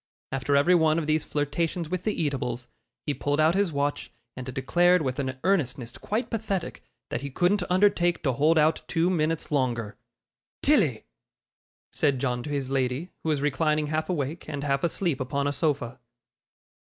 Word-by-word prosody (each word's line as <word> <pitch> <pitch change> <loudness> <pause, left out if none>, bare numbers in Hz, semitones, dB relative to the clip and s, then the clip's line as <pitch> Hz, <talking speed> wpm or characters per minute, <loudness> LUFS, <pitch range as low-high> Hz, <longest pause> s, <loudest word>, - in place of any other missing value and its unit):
After 135 +2 0
every 145 +6 +5
one 160 -2 +4
of 165 - -1
these 155 0 +1
flirtations 155 +3 -2
with 180 +2 -4
the 215 - -1
eatables, 125 -4 -2 0.4
he 145 - 0
pulled 145 +2 -1
out 155 +2 +5
his 195 -2 +1
watch, 145 0 -2 0.2
and 130 0 -6
declared 175 +7 +3
with 130 -1 -2
an 130 -1 -2
earnestness 135 -10 0
quite 220 +4 -3
pathetic 205 -5 -3 0.3
that - - -2
he 140 - -4
couldn't 180 +8 +2
undertake 180 -2 +3
to 135 - +1
hold 155 +6 +3
out 155 +1 +3
two 170 +2 +1
minutes 160 -2 -1
longer. 120 -6 0 0.7
'Tilly!' 195 - +3 0.9
said 140 -2 +2
John 125 -2 -1
to 150 - -7
his 140 -2 -2
lady, 135 +5 -1
who 160 - -2
was 150 -3 +1
reclining 150 +1 +1
half 155 +2 -1
awake 155 -1 -3
and 145 -2 -4
half 140 -1 0
asleep 170 -3 0
upon 140 +2 -1
a 145 - 0
sofa. 140 -5 -1
150 Hz, 170 wpm, -26 LUFS, 135-170 Hz, 0.9 s, every